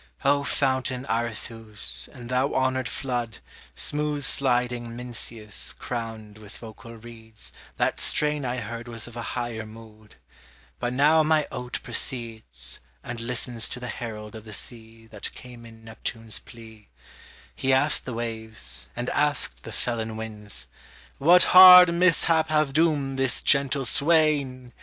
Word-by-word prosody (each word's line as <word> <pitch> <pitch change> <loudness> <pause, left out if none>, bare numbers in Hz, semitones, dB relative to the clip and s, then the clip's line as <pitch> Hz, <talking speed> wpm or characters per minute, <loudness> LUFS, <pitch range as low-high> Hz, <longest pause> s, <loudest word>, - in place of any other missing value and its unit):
O 140 +1 +3
fountain 130 -2 -1
Arethuse, 110 - -4
and 120 -2 -11
thou 130 +3 0
honored 130 -1 0
flood, 120 -5 -3 0.4
Smooth 150 -1 -1
sliding 120 -3 -1
Mincius, 115 -3 -4
crowned 110 -3 -7
with 105 -2 -11
vocal 115 +1 -11
reeds, 110 -1 -11 0.2
That - - 0
strain 150 -1 +2
I 125 -1 -2
heard 115 +1 -6
was 115 -1 -5
of 120 - -12
a 120 - -5 0.2
higher 120 -2 -4
mood; 110 -1 -15 0.6
But 120 0 -2
now 150 +4 +4
my 155 -1 +2
oat 125 0 -4
proceeds, 115 -3 0 0.2
And 120 -1 -6
listens 120 -1 -1
to - - -4
the 125 -1 -6
herald 110 -2 -7
of 110 -1 -10
the 110 -1 -11
sea 115 0 -8
That 110 -2 -6
came 120 -2 -11
in 115 -1 -16
Neptune's 115 0 -3
plea; 110 -2 -15 0.7
He 135 - 0
asked 140 +3 +3
the 125 - -5
waves, 110 - -2
and 120 +1 -4
asked 145 - 0
the - - -9
felon 115 -2 -3
winds, 105 - -6 0.5
What 175 +6 +6
hard 180 -1 +10
mishap 165 -2 +3
hath 150 -3 +1
doomed 145 -4 +1
this 130 -2 +2
gentle 140 -1 +2
swain? 140 -4 +1
120 Hz, 140 wpm, -25 LUFS, 110-135 Hz, 0.7 s, hard